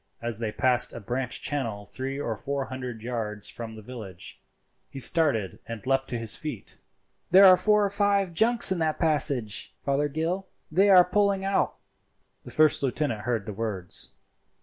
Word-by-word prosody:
As 115 -2 -4
they 110 -2 -2
passed 125 +2 +2
a - - -7
branch 125 +3 -3
channel 115 -10 -3
three 135 +5 -5
or 115 -5 -2
four 140 +5 -3
hundred 125 -4 -7
yards 110 -4 -3
from 115 -1 -8
the 110 -1 -10
village, 105 -7 -9 0.5
he - - -11
started 135 - +3
and 115 -3 -7
leapt 135 0 +1
to 120 - -3
his 115 -2 +1
feet. 150 -10 -7 0.5
"There 190 +2 +8
are 185 -1 +9
four 210 +3 +3
or - - 0
five 200 -3 +1
junks 230 +4 +3
in 185 - 0
that 155 -1 0
passage, 140 -9 0
Fothergill; 155 +7 -1 0.2
they 195 +5 +4
are 180 -2 +8
poling 200 0 +1
out." 195 0 0 0.7
The - - -9
first 155 -1 +3
lieutenant 130 -5 -2
heard 115 -5 -1
the 105 - -6
words. 100 -4 -5
135 Hz, 170 wpm, -26 LUFS, 115-170 Hz, 0.7 s, are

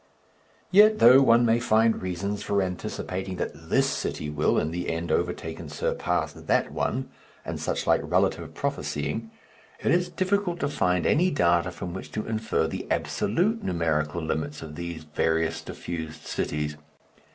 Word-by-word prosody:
Yet, 210 +3 +7
though 125 +3 +8
one 120 -2 +5
may 115 0 +3
find 115 -1 +3
reasons 95 +3 -3
for 100 -1 +1
anticipating 95 +1 -4
that 80 -1 -5
this - - +3
city 75 - -3
will 75 - +1
in 80 - 0
the 90 +1 -3
end 85 +1 -2
overtake 85 -2 -1
and 80 -3 -8
surpass 75 - -1
that - - 0
one 130 +1 -2 0.3
and - - -4
such - - -2
like - - +3
relative - - 0
prophesying, 110 +10 -2 0.5
it - - +1
is 175 +1 +2
difficult 185 0 0
to 140 - +1
find 90 -10 +1
any 180 +4 +4
data 85 - +2
from 90 - -6
which 95 - -7
to 110 - -3
infer 110 -6 0
the - - -4
absolute 195 - 0
numerical 80 -2 0
limits 80 -1 -3
of 80 -1 -8
these 85 -1 -6
various 80 +1 0
diffused 80 -2 -6
cities. 75 0 -2
90 Hz, 155 wpm, -26 LUFS, 80-115 Hz, 0.5 s, though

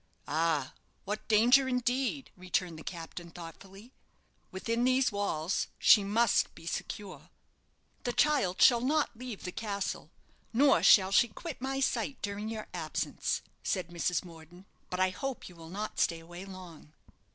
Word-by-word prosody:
"Ah; 155 -3 0 0.3
what 210 +2 -4
danger, 245 +5 +5
indeed!" 255 +2 -1
returned 180 -2 -2
the - - -10
captain, 170 0 -7
thoughtfully. 190 +7 -12 0.6
"Within 230 +5 -2
these 255 0 +3
walls 195 -4 -1
she 205 - +6
must 220 +3 +2
be 165 - -13
secure." 195 +3 -6 0.7
"The 245 - 0
child 240 -10 +2
shall 240 -2 +7
not 290 +1 +1
leave 240 -3 -7
the 180 - -4
castle, 200 -1 -4 0.4
nor 270 +4 +5
shall 190 -2 +6
she 220 +4 +5
quit 270 +6 -8
my 270 +1 -2
sight 255 0 0
during 205 +1 -3
your 220 -1 -5
absence," - - -2 0.2
said 185 -3 -2
Mrs. 175 +1 -1
Morden. 170 +2 -14 0.2
"But 180 - -3
I 185 0 +3
hope 265 +7 -5
you 180 - -13
will 165 -1 -12
not 210 +4 -5
stay 165 -1 +2
away 175 +3 -10
long." 180 -5 -11
200 Hz, 150 wpm, -31 LUFS, 175-240 Hz, 0.7 s, shall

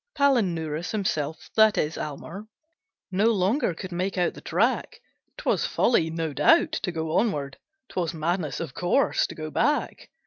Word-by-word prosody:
Palinurus 175 - +1
himself 160 -7 -2
that 220 -1 +5
is 155 +1 0
Almer 165 +8 -6 0.6
No 200 +4 +2
longer 200 - +1
could 185 +2 -7
make 185 +2 -2
out 175 -1 +1
the - - -12
track; - - 0 0.4
'Twas - - 0
folly, 165 -9 +2
no 165 -2 -3
doubt, 330 - +4
to 210 - -2
go 160 -1 -3
onward; 145 - -1 0.3
'Twas 175 -3 -2
madness, 160 -2 -2
of 160 -5 -5
course, 180 +10 +1
to - - -9
go 155 0 -6
back. 295 - 0
175 Hz, 150 wpm, -26 LUFS, 160-215 Hz, 0.6 s, that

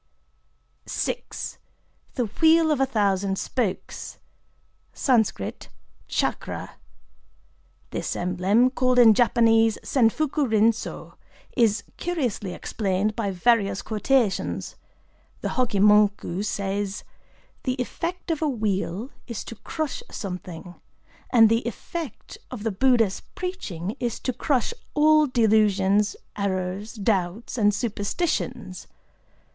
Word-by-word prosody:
VI.—The 60 - -5 0.2
Wheel 320 0 +6
of 295 - +1
a 270 - +3
Thousand 195 -3 +1
Spokes 225 -5 -3 0.8
(Sansc. 220 - 0 0.4
"Tchakra - - -2 0.6
"). 60 0 -37
This - - -3
emblem, 190 +8 +2
called 255 -1 +1
in 230 -3 +8
Japanese 225 -1 +4
Senfuku 275 +3 +1
rin 220 +1 +5
sō, 225 - -8 0.4
is 225 -4 +3
curiously 255 - -2
explained 205 0 -1
by 215 -3 -1
various 200 0 +2
quotations. 220 -1 0 0.7
The - - -2
Hokké 240 -7 0
Monku 205 -2 +4
says:—"The 200 +5 -5
effect 335 +8 -3
of 320 - -2
a 310 - +2
wheel 215 - -2 0.2
is 235 -4 -5
to 230 - -8
crush 315 - -4
something; 180 -3 -7 0.6
and 225 -3 +7
the 230 +1 +2
effect 320 +6 -6
of 240 -5 -7
the 225 - 0
Buddha's 225 -2 +2
preaching 220 - -4
is 240 -2 -2
to 255 - -1
crush 260 - 0 0.2
all 305 0 +5
delusions, 210 -4 +3 0.2
errors, 195 +1 -2
doubts, 200 0 -1
and 210 -4 +4
superstitions. 220 - -2
220 Hz, 105 wpm, -25 LUFS, 195-255 Hz, 0.8 s, in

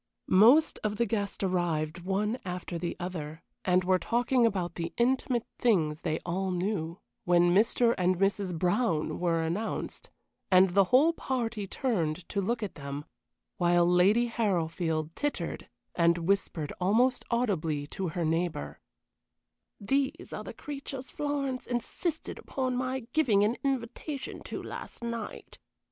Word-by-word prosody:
Most 240 +12 +6
of 210 -1 0
the 235 - +1
guests 205 -2 -2
arrived 175 -3 0
one 205 +6 -1
after 180 -2 -4
the 175 0 -3
other, 160 -3 -5 0.2
and 185 0 +3
were 185 0 +3
talking 240 +2 +2
about 185 -5 -2
the 165 -1 -4
intimate 245 -1 +1
things 160 -10 +2
they 160 -2 -1
all 185 +2 -1
knew, 180 -2 -2 0.2
when 175 0 +4
"Mr. 230 +4 +4
and 180 0 +2
Mrs. 195 -2 0
Brown" 175 -2 +1
were 165 -2 +1
announced, 180 +8 -3 0.4
and 185 0 +6
the 195 +1 +5
whole 280 - +5
party 235 -9 -2
turned 175 - -1
to 200 - -1
look 230 +4 -1
at 205 - -4
them, 140 0 -6 0.5
while 175 -2 +4
Lady 190 +7 +4
Harrowfield 165 -8 -1
tittered, 290 0 -3 0.2
and 170 0 +3
whispered 170 -3 -1
almost 235 +8 +3
audibly 170 -12 0
to 185 +5 -4
her 170 +1 -2
neighbor: 165 -1 -1 1.0
"These 270 +6 -1
are - - -5
the - - -7
creatures 275 -2 -7
Florence 280 -3 -2
insisted 295 +7 -3
upon 255 -2 -2
my 255 +1 -1
giving 230 -10 +4
an 215 +3 +2
invitation 270 +2 -3
to - - -5
last - - -8
night. 235 -1 -6
195 Hz, 140 wpm, -29 LUFS, 175-240 Hz, 1.0 s, Most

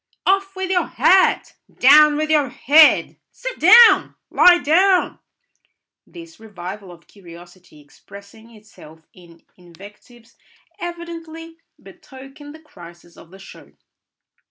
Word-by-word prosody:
"Off 390 0 -2
with 380 0 -6
your 360 -1 -2
hat!" 375 0 0 0.2
"Down 295 +3 +3
with 310 +1 -4
your 295 -4 0
head!" 300 +5 +1
"Sit - - -10
down!" 465 0 +4 0.2
"Lie 355 -1 +4
down!" 360 +4 -1 0.9
This 335 -2 -16
revival 195 -2 -12
of 170 -1 -19
curiosity 175 -3 -19
expressing 200 +9 -19
itself 160 -7 -20
in 170 -2 -21
invectives 205 +7 -20 0.4
evidently 330 -1 -11 0.2
betokened 275 +3 -16
the - - -16
crisis 175 - -19
of 165 - -19
the 190 - -17
show. 195 - -18
270 Hz, 110 wpm, -17 LUFS, -, 0.9 s, down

